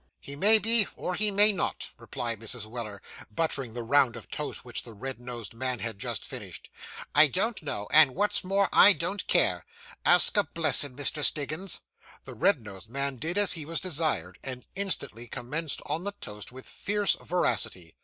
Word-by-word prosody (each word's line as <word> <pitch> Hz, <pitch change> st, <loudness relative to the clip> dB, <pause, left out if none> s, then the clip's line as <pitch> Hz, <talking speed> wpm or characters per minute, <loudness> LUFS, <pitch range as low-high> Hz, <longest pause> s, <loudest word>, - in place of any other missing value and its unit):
'He 140 Hz, -, -9 dB
may 210 Hz, +9 st, +6 dB
be, 225 Hz, -1 st, +5 dB
or 180 Hz, -, -4 dB
he 210 Hz, +4 st, +2 dB
may 205 Hz, +1 st, +5 dB
not,' 190 Hz, -, -4 dB
replied 115 Hz, -3 st, -5 dB
Mrs. 115 Hz, 0 st, -5 dB
Weller, 110 Hz, -3 st, -8 dB, 0.3 s
buttering 130 Hz, -1 st, -3 dB
the 120 Hz, -, -4 dB
round 130 Hz, 0 st, +2 dB
of 115 Hz, -, -12 dB
toast 150 Hz, -3 st, -5 dB
which 120 Hz, -, -4 dB
the 115 Hz, -2 st, -13 dB
red 130 Hz, +4 st, -6 dB
nosed 120 Hz, -3 st, -8 dB
man 125 Hz, +1 st, -3 dB
had 110 Hz, -1 st, -5 dB
just -, -, -3 dB
finished. -, -, -9 dB, 0.4 s
'I 150 Hz, +1 st, +7 dB
don't 195 Hz, -, -1 dB
know, 105 Hz, -9 st, -5 dB
and, 150 Hz, -4 st, +6 dB
what's 205 Hz, +4 st, +1 dB
more, 195 Hz, +1 st, +1 dB
I 205 Hz, -, +10 dB
don't 190 Hz, +3 st, -3 dB
care. -, -, +2 dB, 0.4 s
Ask -, -, +6 dB
a 205 Hz, -, +4 dB
blessin', 145 Hz, -6 st, +2 dB
Mr. 145 Hz, +2 st, 0 dB
Stiggins.' 155 Hz, +7 st, 0 dB, 0.4 s
The -, -, -9 dB
red 160 Hz, -, +1 dB
nosed 100 Hz, 0 st, -10 dB
man 140 Hz, +1 st, -2 dB
did 165 Hz, -, -2 dB
as 205 Hz, -2 st, +3 dB
he 160 Hz, -, -4 dB
was 165 Hz, +3 st, -3 dB
desired, 155 Hz, -, -1 dB
and 130 Hz, -2 st, -6 dB
instantly 140 Hz, -, -4 dB
commenced 145 Hz, +6 st, -4 dB
on 155 Hz, +4 st, -3 dB
the 200 Hz, +1 st, -3 dB
toast 105 Hz, -, -8 dB
with 130 Hz, +1 st, -12 dB
fierce 205 Hz, 0 st, +1 dB
voracity. 95 Hz, -, -1 dB
145 Hz, 185 wpm, -27 LUFS, 120-185 Hz, 0.4 s, I